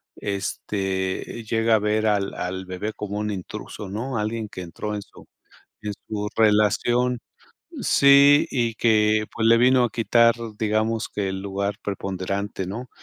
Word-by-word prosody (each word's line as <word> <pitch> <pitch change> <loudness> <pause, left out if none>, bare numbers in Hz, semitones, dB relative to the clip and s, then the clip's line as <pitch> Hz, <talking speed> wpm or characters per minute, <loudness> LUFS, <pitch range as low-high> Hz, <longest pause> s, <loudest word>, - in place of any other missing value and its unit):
este, 95 +1 -3
llega 115 0 +3
a - - +3
ver 105 +1 0
al 100 -2 +1
al 95 +1 -4
bebé 95 +4 -4
como 105 -1 -5
un 105 0 -2
intruso, 100 +1 -7
¿no?, 115 +6 -3
alguien 110 +1 -2
que 95 - -8
entró 105 +5 -5
en 105 - -4
su 100 - -16 0.6
en 105 -1 -4
su 105 -1 -3
relación 115 +3 +2 0.6
Sí, 140 +1 +6
y 120 -3 0
que, 110 -1 +3
pues, 115 -1 0
le 115 0 +6
vino 125 0 +5
a 120 - 0
quitar, 115 0 +4 0.2
digamos 110 +1 0
que 100 -2 -1
el 95 0 -4
lugar 100 0 -2
preponderante, 100 0 -3
¿no? 115 +7 -6
105 Hz, 150 wpm, -23 LUFS, 100-115 Hz, 0.6 s, Sí